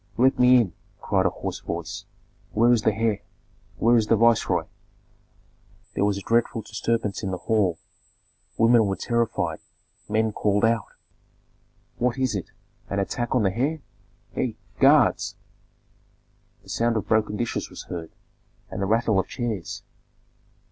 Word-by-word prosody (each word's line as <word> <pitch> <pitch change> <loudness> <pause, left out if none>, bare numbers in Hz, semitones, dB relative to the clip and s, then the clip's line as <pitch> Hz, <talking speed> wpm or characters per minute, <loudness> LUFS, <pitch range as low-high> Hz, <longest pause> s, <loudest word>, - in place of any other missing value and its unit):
"Let 130 +3 +3
me 125 0 +7
in!" 100 -8 0 0.3
cried - - +1
a - - +2
hoarse - - -5
voice. - - -5 0.5
"Where 115 +3 +4
is 115 - +2
the 110 - +3
heir? 110 -1 0 0.6
Where 120 +2 +4
is 110 -2 +1
the 115 - +4
viceroy?" 115 +1 +3 1.3
There - - 0
was 100 -1 +1
a - - -5
dreadful 115 0 +1
disturbance 105 0 -2
in 95 - -3
the 95 - -2
hall. 100 -5 +1 0.8
Women 115 -1 +5
were 95 - 0
terrified; 120 +1 -1 0.5
men 110 +1 +1
called 105 0 +1
out, 115 -1 +1 1.1
"What 125 +1 +1
is 130 -3 0
it? 95 -4 -4 0.4
An 100 - -2
attack 120 +6 -1
on 125 - +3
the 95 -1 +1
heir! 145 +4 -1 0.5
Hei, 115 -4 -2 0.2
guards!" 140 -2 +4 1.3
The 95 - -17
sound 115 +2 +1
of 105 - -3
broken 110 -1 +1
dishes 120 0 -2
was - - -9
heard, 85 -2 -6 0.6
and - - -4
the 95 - 0
rattle 110 -1 +2
of - - -1
chairs. 115 -7 -4
110 Hz, 150 wpm, -25 LUFS, 105-120 Hz, 1.3 s, me